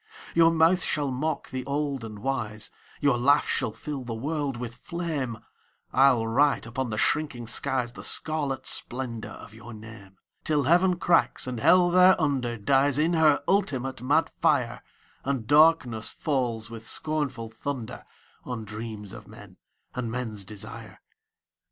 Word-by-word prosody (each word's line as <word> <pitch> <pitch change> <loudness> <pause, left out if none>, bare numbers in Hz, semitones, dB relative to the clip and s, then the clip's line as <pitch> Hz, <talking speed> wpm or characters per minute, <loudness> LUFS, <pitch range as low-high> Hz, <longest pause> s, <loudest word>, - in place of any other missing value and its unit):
Your 165 0 +6
mouth 165 +2 +3
shall 145 -3 0
mock 150 +4 -3
the 130 0 -3
old 140 -2 -2
and 110 -2 -7
wise, 110 -3 -2 0.3
Your 140 -5 +3
laugh 140 +4 +4
shall 120 -5 -1
fill 135 +5 -6
the 120 -2 -5
world 140 +1 -2
with 120 -1 -5
flame, 150 -6 -4 0.6
I'll 130 -4 +4
write 140 +5 +2
upon 125 +2 -3
the 110 - -3
shrinking 140 -1 0
skies 120 +1 0
The - - -9
scarlet 145 -4 -1
splendour 120 -3 -3
of 105 - -12
your 115 +1 -11
name, 105 -3 -12 0.3
Till 150 -2 +1
Heaven 180 +5 +3
cracks, 170 -9 +2
and 125 -2 -4
Hell 175 +8 +5
thereunder 150 -10 +3
Dies 135 +6 +3
in 160 +3 +2
her 155 -3 +4
ultimate 135 - 0
mad 145 +5 +2
fire, - - +1 0.4
And 135 -5 -2
darkness 145 -6 +4
falls, 120 -7 -2
with 115 -1 -9
scornful 135 -7 -2
thunder, 125 -2 -5 0.4
On 120 -3 -5
dreams 105 -1 -7
of - - -11
men - - -14 0.4
and 125 -2 -3
men's 115 -4 -3
desire. 105 +1 -8
130 Hz, 145 wpm, -26 LUFS, 115-150 Hz, 0.6 s, Your